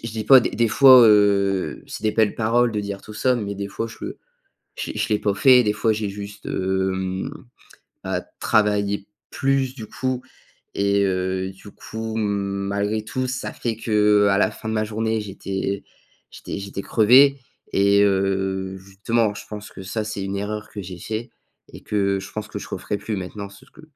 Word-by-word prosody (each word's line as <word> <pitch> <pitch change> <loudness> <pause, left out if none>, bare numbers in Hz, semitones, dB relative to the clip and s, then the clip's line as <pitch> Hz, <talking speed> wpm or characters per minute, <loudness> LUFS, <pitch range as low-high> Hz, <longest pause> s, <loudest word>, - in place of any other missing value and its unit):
je 115 - -5
dis 110 -1 -4
pas, 135 +3 +9
des - - -1
des 115 -1 +1
fois, 130 +2 +8
heu, 100 -2 +3
c'est - - -8
des 105 - +2
belles 110 -2 +2
paroles 120 +2 +2
de 105 - -1
dire 100 -1 -5
tout 105 - -11
ça, 125 +3 +2
mais 100 -3 -4
des 100 0 -5
fois 115 +3 -4
je 115 - -11 0.8
je - - -4
l'ai - - -8
je - - -1
l'ai 105 - +3
pas 100 - 0
fait, 125 +4 +6
des 105 -1 +1
fois 110 +1 +1
j'ai 105 -1 -2
juste, 100 0 -9
hem, 95 +1 -1 0.8
bah, - - -2 0.2
travailler 100 -1 +1 0.2
plus 135 -1 0
du 110 -5 -8
coup 130 -1 -3 0.6
et 100 0 +2
heu, 95 0 -1
du 100 +2 -14
coup, 110 0 -6
malgré 100 +1 -1
tout, 130 +3 -2
ça 125 0 -4
fait 115 -2 -3
qu'à 105 -2 +3
la - - +3
fin 110 - -8
de 110 - -1
ma 110 0 +1
journée, 110 +1 -1
j'étais 100 0 -4 0.5
j'étais - - -7
j'étais 100 0 -6
crevé 135 +5 +5 0.3
et 100 +1 +4
heu, 95 -1 0
justement, 100 +3 -1
je - - -9
pense 105 -1 -8
que - - -10
ça, 105 +3 -3
c'est 105 -2 -4
une 100 +1 -3
erreur 105 +1 -4
que 100 - -6
j'ai 90 -1 -8
fait 110 +5 -5 0.4
et - - -10
que 100 -2 0
je 95 - -9
pense 110 0 -5
que - - -5
je - - -9
referai 105 - -4
plus 105 +2 -4
maintenant, 100 +2 -6
c'est 100 - -16
ce - - -24
que 160 - -16
105 Hz, 195 wpm, -22 LUFS, 100-110 Hz, 0.8 s, pas